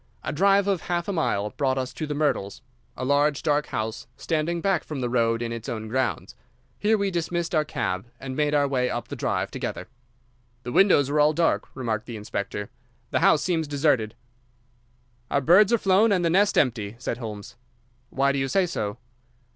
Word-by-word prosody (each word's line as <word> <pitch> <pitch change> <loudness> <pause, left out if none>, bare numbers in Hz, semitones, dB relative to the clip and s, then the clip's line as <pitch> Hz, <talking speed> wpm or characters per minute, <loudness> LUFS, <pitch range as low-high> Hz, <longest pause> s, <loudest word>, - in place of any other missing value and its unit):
A - - -3
drive 195 +4 +3
of 195 -4 +1
half 175 -1 -1
a 200 - -1
mile 105 - 0
brought 135 -2 0
us 130 -1 -3
to 155 +4 -4
The 145 - -3
Myrtles—a 125 -3 -3
large, 145 +1 +2
dark 150 -1 +1
house 110 +1 -4
standing 165 +1 -1
back 195 0 +1
from 150 -3 -6
the 125 -2 -2
road 115 -1 +1
in 115 - -3
its 115 -1 -6
own 110 -1 -4
grounds. 130 +3 -2 0.4
Here 215 +1 +3
we 200 -1 0
dismissed 170 0 -2
our 155 -2 +3
cab, 95 -8 -3
and 130 -1 -6
made 150 0 +1
our 145 -1 +3
way 125 -2 0
up 120 - -4
the - - -5
drive - - -2
together. - - -5 0.8
"The 125 - -5
windows 145 -5 +4
are 150 - +1
all 150 +1 +5
dark," 165 +1 +1
remarked 110 -5 -3
the 120 -3 -6
inspector. 105 -1 -5 0.4
"The - - +2
house - - +4
seems 165 -4 0
deserted." 140 -7 +1 1.1
"Our 140 - +2
birds 185 - +5
are 235 - +5
flown 200 +2 +3
and 180 -3 +2
the 165 - +2
nest 200 +3 +3
empty," 110 -5 +1
said 120 -1 -4
Holmes. 105 -4 -7 0.5
"Why 140 +1 +2
do 140 - -1
you 135 - 0
say 190 +6 +2
so?" 110 -11 -3
145 Hz, 195 wpm, -25 LUFS, 120-170 Hz, 1.1 s, all